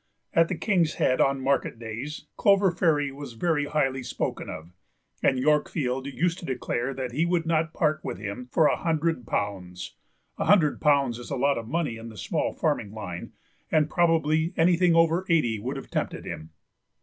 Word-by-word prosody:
At 165 0 +4
the 180 - -2
King's 175 -7 +1
Head 130 - +2
on 135 0 +2
market 135 -2 0
days 115 +7 -6
Clover 200 -3 +4
Fairy 155 -5 +1
was 140 -2 -8
very 150 +4 0
highly 135 -3 0
spoken 125 - -4
of, 80 +3 -8 0.5
and 130 - +3
Yorkfield 135 -2 0
used 170 +5 0
to - - -8
declare 125 0 -2
that 130 -2 -4
he 145 +7 0
would 170 -1 +1
not 165 0 +1
part 155 -2 0
with - - -4
him 105 +5 -6
for 160 - +4
a - - +4
hundred 160 - -1
pounds; 95 -4 -3 0.5
a - - 0
hundred 175 -8 +4
pounds 140 -5 +3
is 120 - -9
a - - -2
lot 140 0 +2
of 115 - -8
money 150 -4 -1
in 115 +1 -8
the 110 - -12
small - - -1
farming 100 - -1
line, 100 -6 -7 0.4
and 155 -1 +2
probably 165 -1 +2
anything 175 0 +4
over 165 +2 +4
eighty 120 -10 +2
would 130 +6 -4
have - - -9
tempted - - -3
him. 80 +1 -7
145 Hz, 185 wpm, -26 LUFS, 120-165 Hz, 0.5 s, At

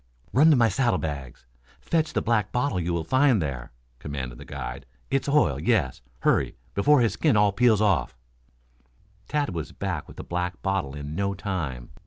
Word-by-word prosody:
"Run 150 +5 +6
to 155 - +6
my 120 -3 +4
saddlebags. 75 - -2 0.3
Fetch 160 - 0
the - - 0
black 105 -3 +1
bottle 125 -6 0
you 85 0 -1
will 85 -1 -1
find 130 - +3
there!" 65 -7 -4 0.3
commanded 65 -4 -6
the - - -10
guide. 60 -4 -7 0.2
"It's 135 +1 0
oil, 150 +1 +3
yes. 90 - +1 0.2
Hurry, - - +2 0.2
before 140 - +4
his 115 -5 +2
skin 145 -4 +2
all 105 -1 +4
peels 110 0 +3
off." 100 -11 +1 1.1
Tad 145 -8 -1
was 80 -3 -5
back - - -4
with - - -13
the - - -6
black 90 +1 -3
bottle 95 -8 -1
in 75 +1 -6
no 100 +3 -1
time. 80 -11 -4
95 Hz, 175 wpm, -26 LUFS, 75-125 Hz, 1.1 s, Run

